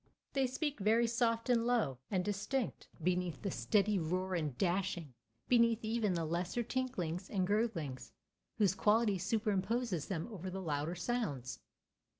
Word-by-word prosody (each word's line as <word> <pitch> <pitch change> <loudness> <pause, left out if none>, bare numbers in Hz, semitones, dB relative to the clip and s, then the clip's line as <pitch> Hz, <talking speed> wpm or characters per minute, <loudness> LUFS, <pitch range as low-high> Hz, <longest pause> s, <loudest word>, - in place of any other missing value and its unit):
They 270 -2 +2
speak 285 +2 -2
very 220 +4 +4
soft 230 0 +1
and 235 -2 +3
low 185 - +1
and 185 -2 0
distinct 210 +5 -2 0.2
beneath 180 -3 0
the 200 - -1
steady 200 - +2
roar 185 +3 -1
and 150 -7 -1
dashing, 175 -5 0 0.3
beneath 230 -2 +4
even 220 -4 +1
the 165 -1 0
lesser 175 +8 -1
tinklings 195 -9 -2
and 190 -3 +1
gurglings 180 - -1 0.5
whose 205 -4 +4
quality 210 -1 +3
superimposes 210 - 0
them 170 -4 -2
over 190 -3 -5
the 190 +1 -4
louder 155 -1 -2
sounds. 165 - -2
195 Hz, 145 wpm, -35 LUFS, 175-230 Hz, 0.5 s, very